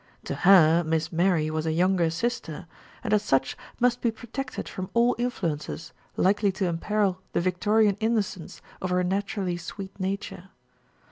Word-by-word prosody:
To - - -4
her, 175 -3 +6
Miss 160 0 -1
Mary 170 -2 +2
was 155 0 -2
a - - +1
younger 175 0 +2
sister, 180 -2 -3 0.4
and - - -1
as 210 - +4
such 135 -9 +1 0.2
must 245 0 +2
be 235 - +2
protected 240 +4 -6
from 185 0 -6
all 240 +1 +4
influences 165 -9 -3 0.2
likely 200 +1 +3
to 190 0 -1
imperil 185 +2 0
the - - +2
Victorian 205 +3 +2
innocence 215 -6 -2 0.2
of 185 - -2
her 180 0 +1
naturally 190 -1 -1
sweet 195 +3 -8
nature. 195 0 -4
190 Hz, 150 wpm, -26 LUFS, 170-210 Hz, 0.4 s, her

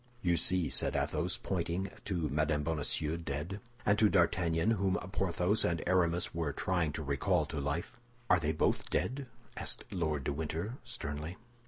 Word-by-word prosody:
"You 85 -1 +3
see!" 90 -1 +3
said - - +3
Athos, - - 0
pointing 90 +1 -2
to 85 -6 -1
Mme. 75 0 +1
Bonacieux 75 0 0
dead, 85 +5 -4 0.3
and 100 0 +4
to 105 - +6
D'Artagnan, 85 0 +2
whom 95 -4 +1 0.2
Porthos 95 +1 +1
and 85 -1 0
Aramis 90 -1 +2
were 80 -4 -1
trying 85 -2 0
to 80 - -4
recall 75 +4 +1
to 75 +1 -4
life. 70 +10 -3 0.3
"Are 90 - +5
they 80 -1 0
both 80 - 0
dead?" 135 +2 -1 0.3
asked - - -2
Lord 80 -6 -1
de - - -1
Winter, 80 - -3
sternly. 75 +5 -4
85 Hz, 160 wpm, -33 LUFS, 75-95 Hz, 0.3 s, to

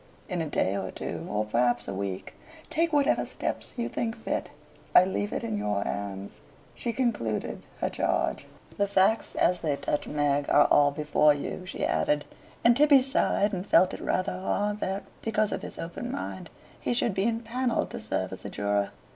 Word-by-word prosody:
In 180 -4 -2
a 160 - -2
day 100 -9 0
or 95 -1 -3
two - - -5
or 105 +1 0
perhaps 120 +2 +1
a - - -3
week 95 -1 -4 0.4
take 330 +1 +2
whatever 290 -1 +3
steps - - -4
you 235 -1 -1
think 225 -1 -2
fit. 225 - -3 0.5
I 180 - +9
leave 205 +2 -2
it - - -3
in 110 -2 -2
your 105 -1 0
hands." 100 -1 -5 0.3
She 235 - -3
concluded 225 - -1 0.2
her - - +1
charge. 65 - 0 0.3
"The 200 - +2
facts 200 +3 +2
as 180 0 +3
they 150 -3 +1
touch 145 - -2
Meg 145 -1 +1
are 145 - +6
all 145 -1 +6
before 150 0 +3
you," 180 +5 -5
she - - -2
added; 150 0 +1 0.4
and 235 0 +6
Tibby 285 -1 +6
sighed 215 -5 +2
and 180 -1 -2
felt 185 - +5
it - - -6
rather 185 - 0
hard 205 +2 -1
that, 195 0 -2 0.2
because 215 -1 +1
of - - -2
his - - -8
open 175 +9 -5
mind, 275 - -5 0.3
he 245 - -1
should 235 -2 +1
be 195 +3 +1
empanelled 235 +2 -1
to - - -5
serve - - -2
as - - -8
a - - -5
juror. 100 -1 0
180 Hz, 190 wpm, -28 LUFS, -, 0.5 s, I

